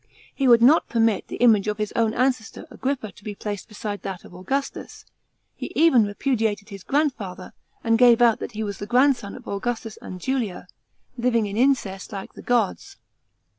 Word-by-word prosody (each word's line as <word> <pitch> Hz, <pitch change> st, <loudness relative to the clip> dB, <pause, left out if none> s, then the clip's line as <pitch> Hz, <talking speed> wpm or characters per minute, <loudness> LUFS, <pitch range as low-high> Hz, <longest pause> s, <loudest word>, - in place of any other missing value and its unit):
He 275 Hz, -, 0 dB
would 235 Hz, -1 st, +6 dB
not 295 Hz, +7 st, +5 dB
permit 225 Hz, -3 st, +1 dB
the -, -, -6 dB
image 220 Hz, -4 st, +4 dB
of 210 Hz, 0 st, -1 dB
his 210 Hz, -1 st, -2 dB
own 225 Hz, -1 st, +1 dB
ancestor 250 Hz, -3 st, -1 dB
Agrippa 260 Hz, -6 st, -3 dB
to 205 Hz, -, -19 dB
be 210 Hz, 0 st, -6 dB
placed 205 Hz, -1 st, -5 dB
beside 210 Hz, -2 st, -6 dB
that 190 Hz, -2 st, -6 dB
of -, -, -14 dB
Augustus; 265 Hz, +11 st, -4 dB, 0.5 s
he -, -, -7 dB
even 285 Hz, -9 st, +5 dB
repudiated 220 Hz, -1 st, -1 dB
his 195 Hz, -2 st, -9 dB
grandfather, 225 Hz, -, -2 dB, 0.3 s
and 225 Hz, -1 st, +2 dB
gave 240 Hz, -2 st, +6 dB
out 235 Hz, -2 st, +4 dB
that -, -, -6 dB
he 220 Hz, +1 st, -3 dB
was 200 Hz, -2 st, -5 dB
the 205 Hz, -, -6 dB
grandson 250 Hz, -4 st, +2 dB
of -, -, -12 dB
Augustus 225 Hz, +1 st, -4 dB
and 185 Hz, -, -8 dB
Julia, 230 Hz, -6 st, -3 dB, 0.5 s
living 235 Hz, -2 st, +2 dB
in 200 Hz, 0 st, -5 dB
incest 230 Hz, -6 st, 0 dB
like 195 Hz, -2 st, -7 dB
the -, -, -11 dB
gods. 235 Hz, -5 st, -1 dB
225 Hz, 180 wpm, -23 LUFS, 205-250 Hz, 0.5 s, would